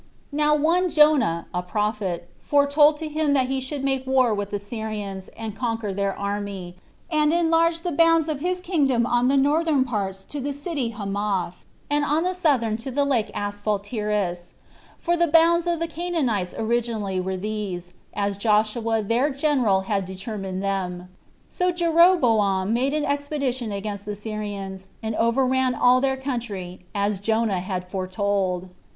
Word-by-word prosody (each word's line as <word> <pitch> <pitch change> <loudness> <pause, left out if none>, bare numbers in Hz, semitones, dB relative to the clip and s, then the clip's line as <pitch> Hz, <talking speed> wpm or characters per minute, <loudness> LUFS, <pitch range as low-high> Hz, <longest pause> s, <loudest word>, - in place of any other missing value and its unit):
Now 300 +1 +3
one 340 +5 +2
Jonah, 300 - +4
a 180 - 0
prophet, 195 -3 -2
foretold 290 +1 +4
to 315 0 -5
him 305 -1 0
that 260 -2 +2
he 265 0 -1
should 270 +1 -4
make 265 -1 -1
war 260 -3 +3
with 205 -1 -3
the 205 - -2
Syrians, 205 -2 -5
and 220 -2 -5
conquer 225 -3 -2
their 200 0 -1
army, 200 -3 -4 0.4
and 305 -1 +3
enlarge 330 0 +2
the 355 - -1
bounds 330 0 +4
of 305 -3 -2
his 360 +3 -1
kingdom 280 -10 +1
on 245 0 +2
the 275 +1 +3
northern 295 0 +3
parts 195 -6 -3
to 295 - -6
the 280 +1 -3
city 285 -4 -3
Hamath, 200 -4 -3 0.2
and 290 0 +1
on 300 +3 +1
the 365 +1 0
southern 265 -11 +1
to 230 +4 -6
the 285 +2 +1
lake 250 -6 +1
Asphaltitis; 205 -3 -2 0.4
for 345 - 0
the 340 0 +2
bounds 335 +2 +4
of 340 -1 +1
the 335 - 0
Canaanites 300 - -1
originally 220 -4 -1
were 190 +1 -2
these, 190 -3 -4 0.2
as 200 -1 -1
Joshua 220 +1 +1
their 235 +7 +1
general 270 -9 +2
had 195 -1 -1
determined 190 0 -5
them. 180 -2 -3 0.4
So 360 0 0
Jeroboam 260 - +3
made 265 +5 +1
an 300 -1 0
expedition 280 -5 -2
against 200 0 -4
the 210 - -3
Syrians, 205 -3 -6 0.2
and 220 0 -2
overran 255 +2 +2
all 250 +2 +4
their 265 -1 +1
country, 205 -9 -5
as 200 -1 0
Jonah 220 -2 +1
had 180 0 -4
foretold. 185 -1 -1
230 Hz, 155 wpm, -24 LUFS, 200-290 Hz, 0.4 s, Jonah